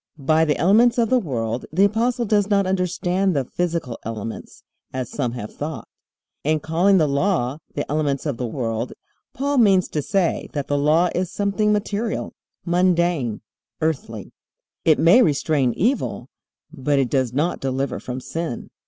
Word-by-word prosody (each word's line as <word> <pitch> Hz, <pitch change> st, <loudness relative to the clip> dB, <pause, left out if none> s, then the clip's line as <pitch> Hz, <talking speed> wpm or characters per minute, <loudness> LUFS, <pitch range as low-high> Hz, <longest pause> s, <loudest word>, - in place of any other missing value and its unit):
By 155 Hz, +3 st, +2 dB
the 150 Hz, -2 st, +1 dB
elements 225 Hz, +8 st, +4 dB
of 230 Hz, -1 st, +1 dB
the 255 Hz, -, +5 dB
world 120 Hz, -, -3 dB
the 185 Hz, +6 st, +3 dB
Apostle 235 Hz, +4 st, 0 dB
does 205 Hz, -1 st, +2 dB
not 200 Hz, -2 st, +3 dB
understand 185 Hz, 0 st, 0 dB
the 135 Hz, -2 st, 0 dB
physical 165 Hz, -6 st, -3 dB
elements, 115 Hz, 0 st, -7 dB, 0.3 s
as 130 Hz, -2 st, -4 dB
some 125 Hz, -5 st, -2 dB
have 110 Hz, -4 st, -7 dB
thought. 150 Hz, -1 st, -6 dB, 0.6 s
In 155 Hz, +1 st, +1 dB
calling 175 Hz, +6 st, +3 dB
the 160 Hz, -, +4 dB
Law 140 Hz, -2 st, 0 dB, 0.2 s
"the 145 Hz, -, -2 dB
elements 145 Hz, -2 st, -1 dB
of 145 Hz, -6 st, -2 dB
the 125 Hz, -, -3 dB
world" 115 Hz, -1 st, -3 dB, 0.4 s
Paul 280 Hz, +1 st, 0 dB
means 195 Hz, -5 st, +4 dB
to 150 Hz, -, -2 dB
say 185 Hz, +2 st, 0 dB
that 145 Hz, -2 st, -2 dB
the 145 Hz, -, 0 dB
Law 160 Hz, +5 st, +3 dB
is 180 Hz, 0 st, -2 dB
something 205 Hz, +1 st, 0 dB
material, 210 Hz, +1 st, -2 dB, 0.3 s
mundane, 170 Hz, -, +1 dB, 0.4 s
earthly. 135 Hz, -, -3 dB, 0.5 s
It 160 Hz, -2 st, +5 dB
may 180 Hz, +10 st, +6 dB
restrain 145 Hz, -, +2 dB
evil, 245 Hz, +9 st, -1 dB, 0.4 s
but 140 Hz, +2 st, 0 dB
it 135 Hz, -3 st, +1 dB
does 130 Hz, -4 st, +1 dB
not 150 Hz, +7 st, 0 dB
deliver 135 Hz, 0 st, -2 dB
from 125 Hz, 0 st, -5 dB
sin. 160 Hz, -1 st, -5 dB
160 Hz, 160 wpm, -22 LUFS, 135-195 Hz, 0.6 s, may